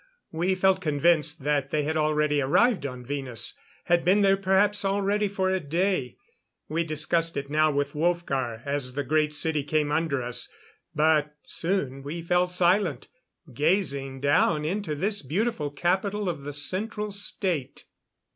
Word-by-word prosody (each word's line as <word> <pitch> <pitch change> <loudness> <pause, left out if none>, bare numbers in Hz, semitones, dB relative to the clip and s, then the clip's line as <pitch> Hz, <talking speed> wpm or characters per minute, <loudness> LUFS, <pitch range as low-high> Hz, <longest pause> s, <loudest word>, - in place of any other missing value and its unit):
We 175 +4 0
felt 190 0 +2
convinced 155 -1 +1
that 145 -2 0
they 150 0 0
had 155 +2 -2
already 150 -1 +1
arrived 185 - +2
on 125 -2 -8
Venus 135 -4 -3 0.3
had 175 -1 +2
been 190 +4 +4
there 195 -1 +5
perhaps 195 +2 +2
already 200 +1 +1
for 190 -1 -1
a 190 - +1
day. 170 -3 -1 0.5
We 165 +2 -1
discussed 165 +1 +1
it 140 0 -4
now 155 +1 +3
with 145 0 -1
Wolfgar 140 -8 -1
as 140 -3 -3
the 145 - -1
Great 155 0 +1
City 150 -1 +1
came 150 0 0
under 150 -4 0
us; 120 0 -1 0.5
but 150 -1 +2
soon 165 -7 -2
we 155 +5 -6
fell 180 +1 +2
silent, 180 -4 +1 0.4
gazing 140 - 0
down 150 +2 +2
into 185 -2 -2
this 200 +7 -1
beautiful 160 - -1
capital 190 +7 -1
of 145 -5 -5
the 145 - -5
Central 210 +8 -2
State. 190 -7 -3
155 Hz, 150 wpm, -26 LUFS, 145-190 Hz, 0.5 s, there